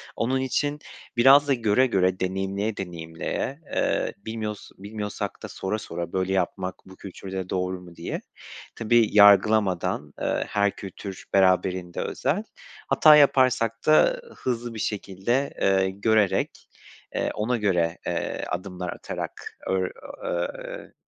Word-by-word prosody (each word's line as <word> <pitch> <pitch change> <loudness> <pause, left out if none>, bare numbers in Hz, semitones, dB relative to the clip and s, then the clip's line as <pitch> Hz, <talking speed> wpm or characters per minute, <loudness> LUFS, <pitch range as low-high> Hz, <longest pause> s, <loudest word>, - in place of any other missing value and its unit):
Onun 130 +3 0
için 145 +3 -1 0.4
biraz 140 +4 +7
da 140 - +4
göre 120 +2 +3
göre, 95 -4 +1
deneyimleye 95 +3 -2
deneyimleye, 85 - -4 0.2
eee, - - 0
bilmiyos 105 0 -5
bilmiyorsak 105 +1 -5
da - - -4
sora 105 +3 -3
sora 85 -2 -6
"Böyle 95 0 0
yapmak 95 0 -1
bu 95 - -13
kültürde 95 -1 -7
doğru 90 0 -2
mu?" 85 -1 -13
diye. - - -5 0.5
Tabii, 115 -1 +3
yargılamadan, 100 -7 +4
eee, - - 0
her 100 -1 +1
kültür 95 0 -8
beraberinde 95 -2 +2
özel. 160 +11 -1 0.4
Hata 155 -1 +7
yaparsak 130 -5 +3
da - - +4
hızlı 120 -2 -3
bir 110 - -7
şekilde, 105 +7 -1
ııı, 95 -1 +3
görerek, 100 +1 +1 0.5
eee, - - 0
ona 120 +4 0
göre, 90 -5 +1
eee, - - -2
adımlar 90 0 -4
atarak - - -7
öğr 95 -1 0 0.3
ııı, 85 0 -1 0.2
eee, - - -9
100 Hz, 130 wpm, -25 LUFS, 95-115 Hz, 0.5 s, biraz